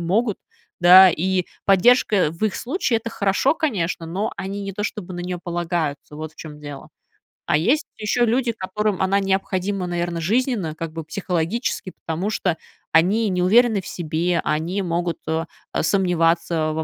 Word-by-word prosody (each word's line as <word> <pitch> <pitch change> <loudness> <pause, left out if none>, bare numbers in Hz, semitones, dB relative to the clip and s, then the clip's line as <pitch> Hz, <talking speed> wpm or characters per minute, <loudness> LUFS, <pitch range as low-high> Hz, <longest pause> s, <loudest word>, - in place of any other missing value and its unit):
могут. 205 +5 0 0.4
Да, 185 +2 +9
и 185 +2 0 0.2
поддержка 200 -1 +4
в 170 +6 -4
их 210 - 0
случае- 255 -3 0
это 230 - -6
хорошо, 200 +8 +1
конечно, 185 - -2
но 190 +6 -2
они 200 +2 -4
не 195 0 -5
то 205 - -4
чтобы 190 -3 -5
на 175 - -5
неё 180 0 -4
полагаются, 170 -4 -3
вот 155 0 -6
в - - -33
чём 150 -2 -9
дело. 145 -2 -9 0.6
А 150 - +3
есть 275 - +1
еще 220 +3 0
люди, 240 +1 +1
которым 210 -1 -2
она 195 +1 +2
необходима, 195 -1 -1
наверно, 175 -1 -2
жизненно, 215 - 0
как 165 0 -5
бы 165 - -5
психологически, 180 +5 -2
потому 170 +5 -2
что 185 -5 0 0.4
они 195 +7 +3
неуверены 200 +4 +3
в - - -11
себе, 170 +1 -1
они 170 +6 -1
могут, 170 -1 -1
э, 160 +1 -1 0.3
а, - - -1
сомневаться 165 -3 +1
во 160 0 -2
185 Hz, 165 wpm, -22 LUFS, 165-205 Hz, 0.6 s, Да